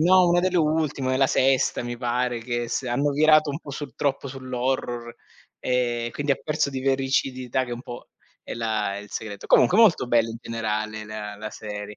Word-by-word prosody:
no, 180 +2 +6
una 175 0 +4
delle 185 0 +1
ultime, 150 -4 +1
è - - +2
la 135 0 +4
sesta 135 -1 +2
mi 120 0 -4
pare, 120 0 -1
che 120 0 -3
se 125 +1 -2
hanno 140 +4 +1
virato 155 +1 +5
un 140 - -4
po' 145 - -10
sul 135 -3 -6
troppo 140 -1 -1
sull'horror 125 -2 -3 0.5
e 120 -2 0
quindi 145 -1 0
ha - - -1
perso 155 -1 0
di 130 -1 -4
vericidità 130 -1 0
che, 120 - -7
un 120 - -5
po', 120 - -9 0.3
è - - -7
la 110 -3 -1
è - - -4
il 105 0 -11
segreto. 105 -2 -6
Comunque, 185 - +5
molto 210 - +5
bello 115 -1 +3
in 115 - -6
generale 110 -1 -3
le 105 -1 -6
la 110 0 -6
serie. 105 -1 -7
125 Hz, 200 wpm, -24 LUFS, 115-140 Hz, 0.5 s, no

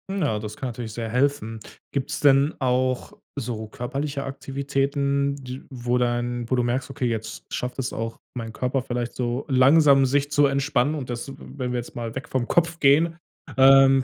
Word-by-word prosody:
Mm, 195 0 -2
ja, 110 -9 +1
das 105 0 -6
kann 130 - -3
natürlich 115 -2 -6
sehr 115 0 -4
helfen. 125 -2 0 0.3
Gibt's 140 +1 -2
denn 140 +1 +4
auch 130 +4 0 0.3
so 115 -3 -4
körperliche 140 +4 -4
Aktivitäten 140 +1 -1
d 130 -1 -7
wo 125 -1 -1
dann 120 -1 -1
wo 130 - +2
du 125 - +2
merkst: 125 +2 -1
„Okay, 135 -1 -3
jetzt 110 -1 -4
schafft 125 +2 -3
es 135 0 -2
auch 115 0 -4 0.2
meinen 115 -2 -5
Körper 130 +2 -1
vielleicht 120 -1 -3
so 125 +2 -2
langsam 135 +1 +6
sich 140 +2 +1
zu 145 0 +4
entspannen 140 +1 +1
und 135 -5 -5
das“ 120 +2 -4
w - - -7 0.2
wenn 125 -2 -2
wir 125 - -1
jetzt 120 - -9
mal 115 -1 -5
weg 135 +4 -5
vom 130 -5 -1
Kopf 170 0 +1
gehen, 160 +4 +4 0.4
ähm, 135 0 +7
130 Hz, 190 wpm, -24 LUFS, 120-140 Hz, 0.4 s, ähm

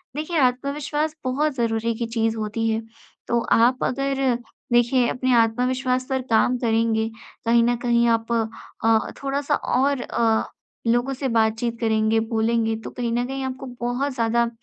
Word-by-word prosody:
देखिए 310 +3 -2
आत्मविश्वास 285 +4 0
बहुत 285 +3 0
ज़रूरी 230 -1 0
की 235 - -2
चीज़ 225 -1 0
होती 220 +1 -1
है 225 0 0 0.5
तो 235 - +2
आप 245 +3 +4
अगर 275 +1 -1 0.5
देखिए 240 +1 +4
अपने 255 0 0
आत्मविश्वास 250 +3 +1
पर 265 -1 0
काम 235 +3 +3
करेंगे 225 -1 +1 0.4
कहीं 235 0 +4
न 240 +1 +2
कहीं 235 0 +3
आप 225 +1 -6 0.5
अ, 225 -1 +3
थोड़ा-सा 280 +1 0
और 275 0 0
अ, 225 -2 +1 0.4
लोगों 240 +3 +2
से 270 +1 -3
बातचीत 230 0 0
करेंगे, 220 -1 +2
बोलेंगे 225 0 0
तो - - -6
कहीं 240 -2 -3
न 240 +1 0
कहीं 270 0 -4
आपको 260 +1 -5 0.2
बहुत 250 +4 -1
ज़्यादा 235 0 +1
240 Hz, 150 wpm, -23 LUFS, 225-260 Hz, 0.5 s, आप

